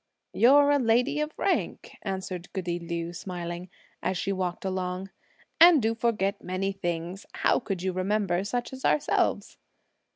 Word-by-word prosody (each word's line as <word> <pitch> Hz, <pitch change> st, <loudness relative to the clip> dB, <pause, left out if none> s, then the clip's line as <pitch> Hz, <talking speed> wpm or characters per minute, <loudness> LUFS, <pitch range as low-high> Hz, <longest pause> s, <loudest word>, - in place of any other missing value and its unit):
"You're 285 Hz, +4 st, +6 dB
a 285 Hz, -, +4 dB
lady 250 Hz, +5 st, +2 dB
of 300 Hz, +1 st, -2 dB
rank," -, -, -1 dB
answered 190 Hz, -2 st, -5 dB
goody 175 Hz, -3 st, -2 dB
Liu 170 Hz, 0 st, -4 dB
smiling, 175 Hz, 0 st, -6 dB, 0.3 s
as 185 Hz, -, -1 dB
she 195 Hz, -, -1 dB
walked 185 Hz, -1 st, -3 dB
along, 185 Hz, 0 st, -3 dB, 0.5 s
"and 335 Hz, -2 st, +9 dB
do 225 Hz, -1 st, +1 dB
forget 215 Hz, -4 st, -1 dB
many 185 Hz, +2 st, -1 dB
things. 175 Hz, 0 st, -4 dB
How -, -, +2 dB
could 185 Hz, -3 st, -4 dB
you 190 Hz, -1 st, -1 dB
remember 190 Hz, -1 st, 0 dB
such 240 Hz, +5 st, -3 dB
as 265 Hz, -, -8 dB
ourselves?" 300 Hz, -, +1 dB
190 Hz, 150 wpm, -27 LUFS, 180-230 Hz, 0.5 s, and